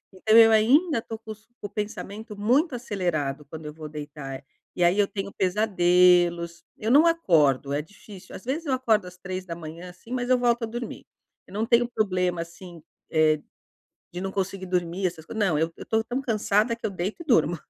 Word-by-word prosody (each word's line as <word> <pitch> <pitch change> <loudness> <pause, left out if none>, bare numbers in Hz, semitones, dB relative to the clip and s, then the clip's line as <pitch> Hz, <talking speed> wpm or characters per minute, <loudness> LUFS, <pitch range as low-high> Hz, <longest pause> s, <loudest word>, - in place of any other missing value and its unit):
Então 215 +4 +4
eu 225 -1 +9
ainda 255 +6 +4
tô 225 0 -7
com 220 0 -10
os 215 +1 -11
com - - -5
o - - -20
pensamento 210 +1 -6
muito 255 - +2
acelerado 170 - -2
quando 155 +2 -9
eu 150 - -6
vou 155 0 -8
deitar, 145 -2 -7 0.3
e 180 - +1
aí 175 +4 +3
eu 205 - +4
tenho 200 -1 -5
pesadelos. 180 -3 +3
Eu 220 +2 -1
não 295 +5 +7
acordo, 150 - +3
é 145 - 0
difícil 195 +3 -13
às - - -10
vezes 290 +7 -3
eu 275 - 0
acordo 225 -7 +1
às 180 0 -12
3h00, 180 -2 -7
assim, 180 +6 -15
mas 250 -1 -2
eu 255 - +5
volto 240 -1 +1
a - - +2
dormir. 235 +2 -6 0.4
Eu - - -15
não 215 +2 -1
tenho 235 +1 +3
problema, 185 -6 0
assim, 170 0 -10 0.3
eh, 155 -1 +3 0.7
de 175 - -5
não 195 0 -3
conseguir 190 0 -3
dormir, 180 +1 -1
essas 165 -3 -7
coisas. 220 +4 -2
Não, 170 -6 +2
eu 165 +1 0
eu - - -9
estou 220 0 0
tão 245 +4 -3
cansada, 220 -1 +1
que 230 - -8
eu - - +1
deito 190 - -4
e - - -29
durmo. 175 - +3
195 Hz, 205 wpm, -25 LUFS, 170-225 Hz, 0.7 s, eu